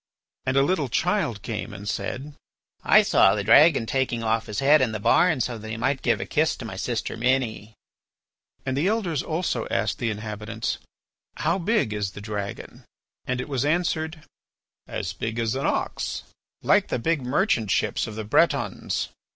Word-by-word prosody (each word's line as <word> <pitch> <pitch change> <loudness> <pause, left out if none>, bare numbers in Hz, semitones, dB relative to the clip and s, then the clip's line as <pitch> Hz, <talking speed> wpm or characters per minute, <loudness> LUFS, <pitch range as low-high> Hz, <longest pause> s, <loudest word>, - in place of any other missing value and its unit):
And 130 +1 +1
a 135 - +6
little 145 -3 0
child 120 - 0
came 105 -2 -5
and 100 +1 -8
said: 140 +7 -4 0.5
"I - - +6
saw 95 - +5
the 105 - -2
dragon 140 +4 +6
taking 120 -2 -1
off 115 0 0
his 105 - -5
head 145 +3 +5
in 120 -4 +1
the 110 - -3
barn 155 - +3
so 120 -1 -2
that 110 +1 -8
he 110 - -4
might 135 +4 0
give - - +1
a - - -3
kiss - - +1
to - - -8
my - - -6
sister - - -3
Minnie." 115 -3 -1 0.9
And 130 -1 -1
the 150 +7 +1
Elders 190 - 0
also 160 -8 -2
asked 110 - -1
the 120 - 0
inhabitants: 110 +1 -4 0.6
"How 170 +5 +1
big 205 - +1
is 100 -2 -3
the - - -8
dragon?" 105 -1 -6 0.4
And 125 0 -1
it - - -4
was 135 -3 -1
answered: 160 0 -1 0.6
"As 95 - -4
big 110 +3 -4
as 115 -2 0
an 135 +1 -1
ox." - - -2 0.4
"Like - - +4
the - - -1
big 160 +5 0
merchant 125 - +1
ships - - 0
of 110 - -7
the 110 - -4
Bretons." 105 - +1
125 Hz, 180 wpm, -25 LUFS, 110-150 Hz, 0.9 s, a